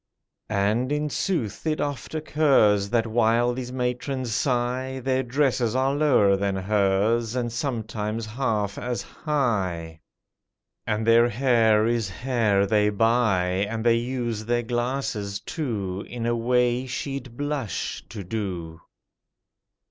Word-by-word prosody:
(And, 110 +5 +1
in 150 0 -1
sooth, 155 - -2
it 155 -1 0
oft 145 0 -3
occurs 135 -10 +3
That 115 0 +2
while 115 +2 +2
these 125 0 -5
matrons 125 0 -2
sigh, 130 +2 -1
Their 130 +1 0
dresses 130 -2 +1
are 135 +1 +2
lower 130 -10 +4
than 100 0 -1
hers, 105 +4 +1
And 120 -2 -1
sometimes 115 -3 -3
half 105 -3 -2
as 125 -1 -3
high; 95 - -2 0.9
And 110 0 0
their 115 +1 +5
hair 115 -3 +3
is 115 -3 0
hair 110 -1 +1
they 105 0 +3
buy, 105 -4 +2
And 115 0 -4
they 115 -1 +5
use 120 -3 -3
their 120 +1 0
glasses, 120 -4 -2
too, 105 - -4
In 120 -1 -5
a 120 0 +1
way 125 +2 +1
she'd 130 -1 -5
blush 145 -6 -3
to 105 -3 -7
do.) 90 -5 -5
115 Hz, 125 wpm, -25 LUFS, 105-130 Hz, 0.9 s, their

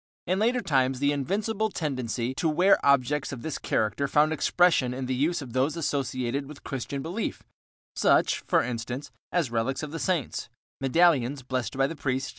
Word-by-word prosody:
In 185 +2 0
later 240 +3 +2
times 135 - +1
the 140 +2 +2
invincible 205 - -1
tendency 130 - -2
to 160 +4 0
wear 180 +6 +4
objects 140 +1 +2
of 125 -4 -7
this 160 - -3
character 110 +6 0
found 150 +3 +3
expression 160 -6 +3
in 130 0 -3
the 130 - -1
use 150 +5 0
of 120 -3 -10
those 135 +5 +1
associated 135 -3 -2
with 150 0 -11
Christian 135 +1 -4
belief, 185 +7 -4 0.5
such, - - +3
for - - +3
instance, 125 +3 -5 0.2
as 165 -9 0
relics 120 +5 -1
of 150 - -5
the 165 - -5
saints, 175 -9 -1 0.3
medallions 135 -2 +3
blessed 130 0 -3
by 135 - +3
the 165 - -3
priest, 130 -2 -1
etc. - - -6
140 Hz, 180 wpm, -27 LUFS, 130-165 Hz, 0.5 s, wear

